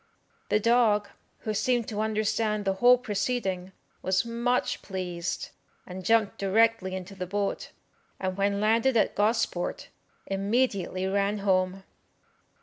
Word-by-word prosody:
The 210 - +3
dog, 220 -2 +3 0.3
who 215 - -2
seemed 240 +1 +1
to 210 -1 -2
understand 215 -1 0
the 195 - +2
whole 245 +1 +7
proceeding, 200 -5 -2 0.3
was 190 +3 +1
much 235 +2 0
pleased, 180 -2 -4 0.4
and 185 +1 -8
jumped 225 0 +2
directly 200 -1 +2
into 190 +1 -7
the 185 -2 -5
boat, 200 +2 -2 0.5
and 185 -1 -2
when 200 +1 0
landed 230 +4 +3
at - - +2
Gosport, 210 -4 0 0.4
immediately 195 -2 0
ran 200 +2 0
home. 185 0 +1
205 Hz, 125 wpm, -27 LUFS, 190-225 Hz, 0.5 s, whole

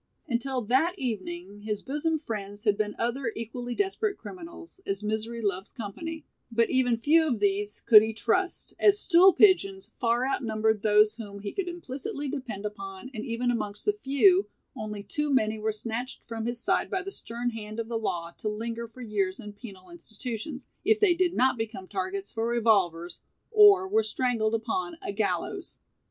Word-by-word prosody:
Until 255 0 -1
that 270 - +2
evening 200 - -4
his 210 -1 -3
bosom 300 +4 0
friends 205 -7 -6
had 210 -2 +3
been 210 0 -2
other 240 +1 -1
equally 240 +2 -5
desperate 405 +1 0
criminals, 345 0 -10
as 195 +1 -3
misery 220 +2 -2
loves 195 -2 -2
company, 310 +9 -6 0.3
but 230 0 +2
even 250 -3 +3
few 315 +7 +4
of 245 -7 0
these 205 +1 0
could 215 -2 +9
he 220 +1 -1
trust, 365 - 0
as 410 -1 +5
"stool 375 -1 +6
pigeons" 385 0 +3
far 240 +1 +2
outnumbered 220 -5 0
those 210 0 +5
whom 205 -3 -8
he 200 0 -4
could 390 -2 -3
implicitly 290 -4 -5
depend 255 -8 -5
upon 195 +3 -7
and 220 -2 -5
even 245 +1 0
amongst 210 -3 -3
the 415 - +3
few, 370 +2 +4 0.3
only 210 -4 -5
too 295 +8 -2
many 220 -4 +2
were 220 +1 0
snatched 230 +4 -4
from 225 0 -4
his 240 0 -2
side - - +1
by 380 0 -1
the 390 - -6
stern 240 - -4
hand 215 -1 -7
of 230 - -3
the 230 -1 -2
law 170 -6 -3
to 215 - -2
linger 230 +2 -4
for 230 +3 -13
years 200 -4 -1
in 210 -3 -8
penal 195 -5 -12
institutions, 235 - -6 0.2
if 435 +2 +3
they 410 -4 +5
did 355 0 +1
not 260 -1 +3
become 215 -4 -4
targets 195 0 -3
for 225 0 -1
revolvers 195 -8 +1 0.3
or 410 -4 +7
were 220 - +3
strangled 220 0 0
upon 220 -6 -2
a - - -2
gallows. 205 0 -2
230 Hz, 175 wpm, -28 LUFS, 210-275 Hz, 0.3 s, could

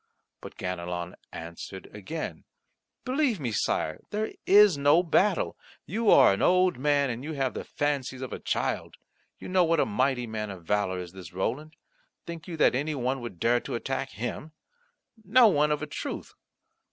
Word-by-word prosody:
But - - -10
Ganelon 90 -1 -4 0.2
answered 85 +3 -8
again: 130 - -6 0.6
"Believe 260 - +1
me, 125 -5 -2
Sire, 80 -6 -1
there 215 +1 -2 0.2
is 205 -3 +7
no 145 +5 +4
battle. 185 +2 +2 0.3
You 220 +3 0
are - - +7
an 100 - -3
old 180 -3 +3
man, 140 -1 +2
and 120 +2 -6
you 155 +2 -4
have 135 -3 -1
the - - -5
fancies 135 -3 -2
of 130 - -6
a - - -5
child. - - -2 0.4
You - - -9
know 185 -1 +3
what 165 -1 +2
a - - +4
mighty 125 +3 0
man 110 -2 -4
of 95 -4 -9
valour 100 -1 0
is 90 -1 -6
this 95 -2 -11
Roland. 130 - -3 0.5
Think 170 -2 -8
you 170 -2 -5
that - - +4
any 145 +4 -1
one 130 0 -1
would 120 -8 -8
dare 120 +4 +3
to - - -5
attack 135 +3 -3
him? 125 +7 -5 0.7
No 230 +4 +6
one, 150 -6 +3
of 150 0 0
a - - -1
truth. 150 - -6
135 Hz, 175 wpm, -27 LUFS, 105-165 Hz, 0.7 s, is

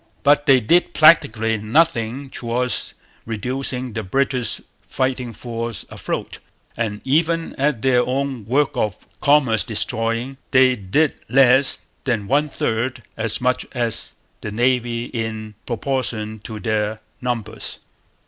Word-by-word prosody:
But 145 +1 +4
they 135 -2 +7
did 170 +10 +2
practically 110 -8 +5
nothing 130 +1 +1
towards 125 +1 -2 0.3
reducing 125 +2 -2
the 110 - -2
British 125 +3 0 0.3
fighting 130 -2 -1
force 115 -1 -5
afloat; - - -4 0.4
and 105 -3 -3
even 165 +4 +1
at 135 -5 0
their 125 -2 +4
own 130 -3 -2
work 140 +4 +1
of 105 -4 -1 0.2
commerce 135 -7 +5
destroying 115 +3 0
they 130 -1 +5
did 125 +10 +1
less 130 +1 +5 0.3
than 115 -6 -1
one 145 +5 +2
third 120 0 -2
as 110 -1 -1
much 125 0 +1
as 120 -3 -2 0.3
the 105 - -4
Navy 120 +1 0
in 110 -3 -4
proportion 115 -3 -2
to 110 -2 -6
their 110 -1 -1 0.2
numbers. 120 -4 -4
125 Hz, 120 wpm, -21 LUFS, 110-135 Hz, 0.4 s, they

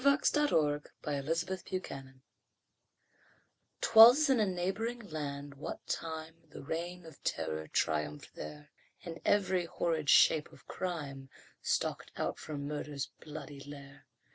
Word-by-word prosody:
A - - -9
TALE 280 0 +6
OF 160 - +2 0.2
THE 150 - -2
REIGN 140 -1 -2
OF 170 +4 -1
TERROR 135 -7 -6 1.7
'Twas 245 +7 +9
in 255 - +4
a 210 - +3
neighboring 190 +6 -1
land 145 -3 -5
what 140 - -7
time 160 0 -4 0.2
The 145 - -10
Reign 170 +3 -4
of 160 -3 -14
Terror 80 -1 -2
triumphed 75 -2 -1
there, 75 -1 -9 0.3
And 165 -1 -7
every 185 -3 +2
horrid 160 -3 -1
shape 155 -2 +6
of - - -17
crime 145 -7 -4 0.3
Stalked - - -1
out - - -2
from 145 -2 -5
murder's 145 -1 -4
bloody 150 -2 -8
lair. 140 0 -11
155 Hz, 135 wpm, -33 LUFS, 140-180 Hz, 1.7 s, Twas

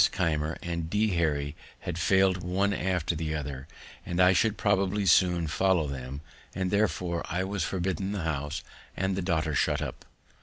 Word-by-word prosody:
Keimer 80 -3 0
and 85 -2 -3
D. 105 +3 +2
Harry 75 -5 0 0.3
had 85 -1 -4
failed 95 +1 +3
one 95 +3 +1
after 90 -3 0
the 80 0 -2
other, 70 -2 -5 0.4
and 85 - -3
I 90 +1 +6
should 105 +3 +2
probably 100 0 +1
soon 90 -1 +4
follow 90 +2 +2
them; 70 0 -5 0.3
and, 95 -1 -1
therefore, 90 -4 0
I 90 +2 0
was 95 -2 -2
forbidden 95 +1 -2
the 100 -4 -3
house, 75 -2 -2 0.3
and 95 +1 0
the 95 - -1
daughter 80 -4 0
shut - - +2
up. - - -5
90 Hz, 165 wpm, -28 LUFS, 80-95 Hz, 0.4 s, I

